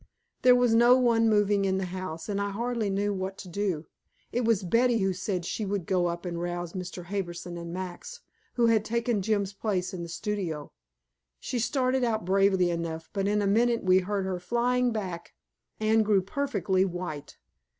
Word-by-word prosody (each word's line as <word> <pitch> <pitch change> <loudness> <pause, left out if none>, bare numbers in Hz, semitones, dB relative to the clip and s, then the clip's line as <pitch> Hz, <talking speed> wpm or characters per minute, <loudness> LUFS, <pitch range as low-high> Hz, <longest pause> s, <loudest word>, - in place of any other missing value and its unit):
There 250 -1 +7
was 245 -2 +3
no 240 +2 +6
one 230 -3 +3
moving 205 -1 +3
in 190 -1 +1
the 190 - -1
house, 180 -3 -6
and 200 -1 -1
I 200 - -1
hardly 230 +1 -2
knew 200 +1 0
what 190 0 -4
to 190 - -9
do. 180 -4 -2 0.5
It 245 - 0
was 220 -4 +2
Betty 235 +6 +3
who 195 -3 +1
said 185 -1 -3
she 215 - -3
would 200 -3 -2
go 180 -1 +1
up 170 +1 -4
and 170 -1 -3
rouse 175 -1 -4
Mr. 180 -1 -6
Harbison 175 -2 -4
and 170 0 -6
Max, 185 - -7 0.3
who 240 - +3
had 225 -2 +3
taken 230 -1 0
Jim's 200 -1 0
place 195 -2 -2
in 180 - -5
the 170 - -6
studio. 175 -6 -3 0.7
She 250 - -3
started 255 +2 +1
out 220 -6 0
bravely 190 -1 +3
enough, 165 -1 -4
but 195 -1 0
in 210 0 +1
a - - +1
minute 235 +3 +2
we 185 0 +5
heard 195 +1 -2
her 185 -1 -2
flying 245 +6 +1
back. 185 -6 -5 0.4
Anne 220 +1 +3
grew 205 -3 +3
perfectly 195 - 0
white. 175 -6 -5
195 Hz, 190 wpm, -28 LUFS, 180-225 Hz, 0.7 s, There